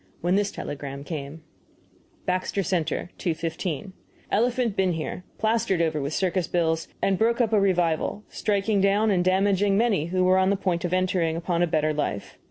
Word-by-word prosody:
when 175 +2 +1
this 200 +1 +2
telegram 140 -1 -6
came: 150 0 -6 0.8
BAXTER 185 +2 -1
CENTER, 175 -2 -1
2.15. 165 +1 -3 0.4
Elephant 240 0 +1
been 190 -2 +2
here, 160 +3 -4
plastered 220 -5 +1
over 160 -3 +1
with 140 +1 -3
circus 185 +1 0
bills, 165 -2 0 0.2
and 195 -1 +2
he - - -14
broke 230 +2 +2
up 230 -3 +2
a 210 - +5
revival, 180 0 +1
striking 205 -1 0
down 205 +2 +3
and 180 -2 +2
damaging 195 +1 +2
many 210 -8 +2
who 185 +1 +1
were 185 +1 +4
on 190 0 +3
the 200 - +3
point 180 -3 -1
of 175 - -2
entering 180 -3 +1
upon 170 0 -1
a 175 - +3
better 155 -1 +1
life. 145 -9 -3
185 Hz, 180 wpm, -25 LUFS, 165-200 Hz, 0.8 s, a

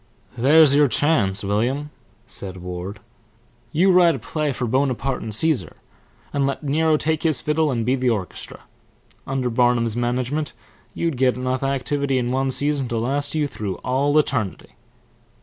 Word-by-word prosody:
"There's 140 +4 +6
your 145 0 +5
chance, 110 -7 +1
William," 125 +9 -1 0.3
said 95 -4 -6
Ward. 90 +2 -6 0.7
"You 180 +5 +3
write 175 -3 +5
a - - -4
play 145 +5 -2
for 125 -1 -3
Bonaparte 130 +1 0
and 110 -2 -3
Caesar, 125 - 0 0.6
and 140 -1 +1
let 140 +3 -3
Nero 155 +2 +2
take 155 0 -1
his 155 -6 +2
fiddle 150 +2 +1
and 115 -4 -1
be 125 - +2
the 130 -1 +1
orchestra. 100 -6 -4 0.7
Under 130 -2 -1
Barnum's 120 -1 +2
management 125 +5 -1 0.4
you'd 165 -6 -1
get 130 0 +2
enough 130 +1 -2
activity 140 0 0
in 120 -1 -1
one 135 +1 0
season 140 0 +1
to 120 -1 -2
last 140 +6 -1
you 155 -1 +1
through 105 -8 -4
all 140 +4 +1
eternity." 115 -10 -1
130 Hz, 155 wpm, -22 LUFS, 120-145 Hz, 0.7 s, There's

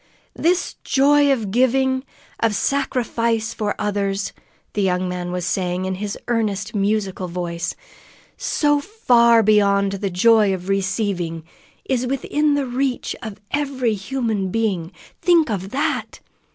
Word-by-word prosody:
"This 350 +2 0
joy 285 +1 +4
of 225 -7 -1
giving, 260 +2 +2 0.4
of 225 -2 +1
sacrificing 235 -5 0
for 210 -1 -1
others," 200 -1 -1 0.4
the 205 - 0
young 185 -1 +1
man 180 0 -4
was 180 -1 -3
saying 180 +1 -1
in 190 - -1
his 200 +2 -4
earnest, 215 -3 -1
musical 200 -2 -1
voice, 170 0 -3 0.6
"so 290 -1 +1
far 240 - +4
beyond 200 -2 +3
the 195 0 -2
joy 205 +2 +4
of 185 +1 -8
receiving, 190 -4 -1 0.4
is 255 -1 0
within 290 +3 +1
the 285 -1 0
reach 255 +1 -2
of 220 -4 -7
every 270 -5 0
human 215 -2 -2
being. 190 -5 -1 0.3
Think 335 -6 +4
of 195 -2 -3
that! 275 +6 -2
215 Hz, 130 wpm, -21 LUFS, 195-260 Hz, 0.6 s, joy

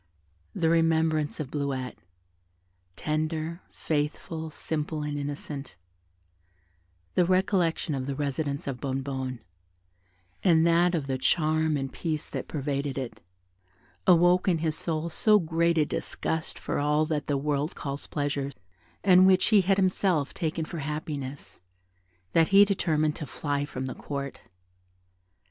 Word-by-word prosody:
The 165 - +1
remembrance 160 -2 +2
of 145 -3 -4
Bleuette, 135 -3 -3 1.0
tender, 155 +2 -2
faithful, 160 +1 -3
simple, 155 0 -3
and 150 0 -3
innocent; 145 0 -5 1.4
the 180 - +4
recollection 185 -3 +1
of 130 -1 -3
the 140 - -2
residence 140 0 -2
of 135 -3 -4
Bonnebonne, 130 -2 -3 1.0
and 165 -3 +5
that 170 +1 +4
of 155 -4 -1
the 135 -1 -2
charm 155 +1 +2
and 135 -1 -4
peace 155 -3 -3
that - - -4
pervaded 140 -1 -2
it, 130 -3 -5 0.9
awoke 175 +2 +5
in 175 -3 +3
his 160 -1 -1
soul 165 0 -2
so 215 +4 +5
great 170 -1 +1
a 155 - +4
disgust 160 0 -2
for - - -2
all 150 +2 +2
that 155 -2 -2
the 145 - +1
world 145 +2 -1
calls 140 0 -4
pleasure, 145 -2 -2 0.5
and 185 -1 +7
which 185 -1 +4
he 210 -3 +6
had 190 +1 +2
himself 185 -6 +1
taken 160 -2 -2
for 165 +1 -6
happiness, 145 -2 -5 0.7
that 165 -1 +5
he 200 +1 +7
determined 155 -6 +1
to 150 - -5
fly 145 +1 -2
from 130 -2 -5
the 130 - -4
Court. 140 -1 -5
155 Hz, 135 wpm, -27 LUFS, 140-165 Hz, 1.4 s, and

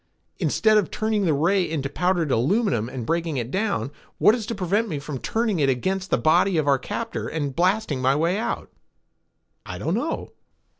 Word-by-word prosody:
"Instead 215 -1 +3
of 200 - -2
turning 215 -2 0
the 160 - +3
ray 180 +7 +2
into 155 -5 -2
powdered 170 +1 0
aluminum 125 - +1
and 125 -3 -5
breaking 165 -1 -1
it 120 0 -3
down, 200 -7 -1 0.3
what 210 - +5
is 225 -3 -3
to 230 - -3
prevent 200 +4 0
me 155 - -2
from 140 -1 -6
turning 220 - -1
it 140 -2 +3
against 185 +9 -1
the - - +2
body 175 +3 +3
of 155 -2 0
our 140 -2 +4
captor 230 - -4
and 145 -4 -3
blasting 180 -6 +1
my 130 +2 +3
way 170 +6 +1
out?" 230 - -3 0.9
"I - - -7
don't - - -2
know." - - -2
170 Hz, 190 wpm, -24 LUFS, 140-205 Hz, 0.9 s, what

